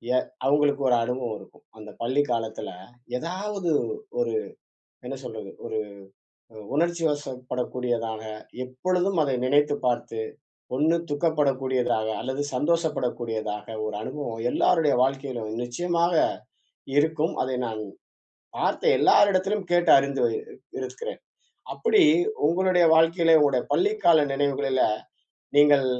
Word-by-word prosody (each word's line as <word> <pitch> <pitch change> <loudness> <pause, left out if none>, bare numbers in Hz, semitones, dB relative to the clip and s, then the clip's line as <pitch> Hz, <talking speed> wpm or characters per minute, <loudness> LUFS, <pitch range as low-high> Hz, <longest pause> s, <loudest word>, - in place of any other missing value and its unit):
எ - - +5 0.3
அவுங்களுக்கு 145 0 +2
ஒரு 120 - +4
அனுபவம் 125 -2 -3
இருக்கும். - - -17 0.2
அந்த 105 0 -10
பள்ளி 135 +5 +2
காலத்தில, 115 -2 -3 0.5
ஏதாவது 185 +1 -3 0.5
ஒரு - - -1 0.7
என்ன - - -4
சொல்றது? - - -7
ஒரு 110 - -3 0.7
ஒரு 110 - -11
உணர்ச்சிவசப்படக்கூடியதாக, 125 -8 -2 0.4
எப்பொழுதும் 180 +8 -1
அதை 135 -2 0
நினைத்து 145 +2 +3
பார்த்து, 120 -2 -1 0.6
ஒண்ணு 160 +4 +3 0.2
துக்கப்படக்கூடியதாக, 135 -7 0
அல்லது 130 +2 -3
சந்தோஷப்பட 155 -1 +1
கூடியதாக 110 -3 -4 0.2
ஒரு 105 - -4
அனுபவம் 120 -4 -5
எல்லாருடைய 165 -5 +3
வாழ்க்கையிலும் 130 -5 -3
நிச்சயமாக 170 +7 0 0.9
இருக்கும். 160 +1 +1
அதை 130 -1 -2
நான் 110 -1 -5 0.8
பார்த்த - - -1
எல்லார் 205 0 +5
இடத்திலும், 195 +2 0
கேட்டு 175 0 +3
அறிந்து 140 0 0
வருகிறே 115 -1 -3 0.3
இருக்கிறேன். 475 +2 -6 0.5
அப்பிடி 440 -4 +3 0.4
உங்களுடைய 180 0 +3
வாழ்க்கையில, 165 0 +5
உங்களுடைய 140 -4 +3
பள்ளி 405 +3 +2
கால 160 -3 +6
நினைவுகளில, 135 -1 0 0.8
நீங்கள் 145 -2 +6
145 Hz, 110 wpm, -25 LUFS, 125-170 Hz, 0.9 s, கால